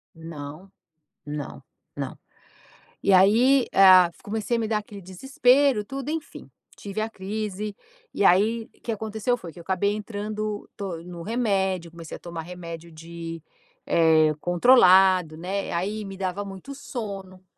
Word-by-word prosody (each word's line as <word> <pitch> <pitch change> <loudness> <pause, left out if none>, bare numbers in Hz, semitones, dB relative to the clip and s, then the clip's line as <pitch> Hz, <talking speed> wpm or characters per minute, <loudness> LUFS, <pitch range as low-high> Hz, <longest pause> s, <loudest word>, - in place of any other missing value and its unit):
Não, 165 +3 -9 0.5
não, 145 -2 -6 0.3
não. - - -5 0.9
E 200 - +3
aí, 235 +8 +5
eh, - - +2
ah, 185 -2 +8
comecei 220 +3 -2
a - - -1
me 225 - -1
dar 215 -1 +1
aquele 205 -1 -10
desespero 250 +5 +2
tudo, 275 +4 -5
enfim, 320 0 -6 0.3
tive 200 +1 -5
a 220 - -1
crise, 210 0 -5 0.4
e 200 - 0
aí 215 +6 +4
o - - -30
que 235 - -5
aconteceu 220 +2 -1
foi 170 -8 -10
que - - -15
eu - - -9
acabei 190 +3 0
entrando 210 0 -4
to 180 -5 -5
no 175 -1 -8
remédio, 190 -5 -1
comecei 165 -2 -9
a - - -13
tomar 170 -2 -6
remédio 170 -1 -9
de 165 +1 -8 0.5
eh, 160 -2 +4
controlado, 185 -4 +5
né, 190 +4 -3
aí 205 +5 -2
me 195 -1 -8
dava 190 +1 -3
muito 195 +8 -9
sono. 195 -8 -7
195 Hz, 150 wpm, -25 LUFS, 175-215 Hz, 0.9 s, ah